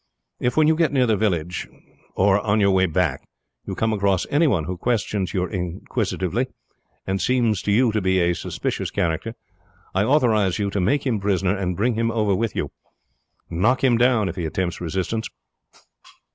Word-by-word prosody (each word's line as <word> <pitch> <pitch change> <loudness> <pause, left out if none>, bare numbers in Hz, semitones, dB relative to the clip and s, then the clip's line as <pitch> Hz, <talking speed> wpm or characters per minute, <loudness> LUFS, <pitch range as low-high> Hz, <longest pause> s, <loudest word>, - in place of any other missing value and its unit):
If, 125 +2 -1
when 155 -1 +5
you 160 - +4
get 165 -2 +2
near 130 -3 +3
the 110 -2 +2
village, 90 -5 -1 0.5
or 100 +1 +3
on 105 +1 +1
your 100 -1 +4
way 95 0 +3
back, 80 -5 0 0.5
you - - -4
come 110 0 0
across 100 -3 +1
any 155 +3 +4
one 95 - +1
who 90 +4 -4
questions 105 -2 -1
you 90 -2 0
inquisitively, 90 +5 -2 0.6
and 95 0 -1
seems 120 -6 +1
to 105 - -1
you 115 +3 +3
to 110 0 0
be 95 0 +2
a 85 0 +2
suspicious - - -3
character, 90 +7 -2 0.6
I 95 - +2
authorize 110 -8 +2
you 100 -2 -1
to 100 - -1
make 140 +10 +1
him 120 -5 0
prisoner 95 -1 +1
and 90 -3 -2
bring 120 +4 +1
him 115 +1 0
over 110 -3 +1
with 110 +2 -1
you. - - -2 0.8
Knock 115 +12 +1
him 125 -3 +4
down 120 -3 +3
if - - -5
he 85 - -2
attempt 90 +2 -3
resistance. 95 +6 -2
100 Hz, 185 wpm, -22 LUFS, 95-115 Hz, 0.8 s, when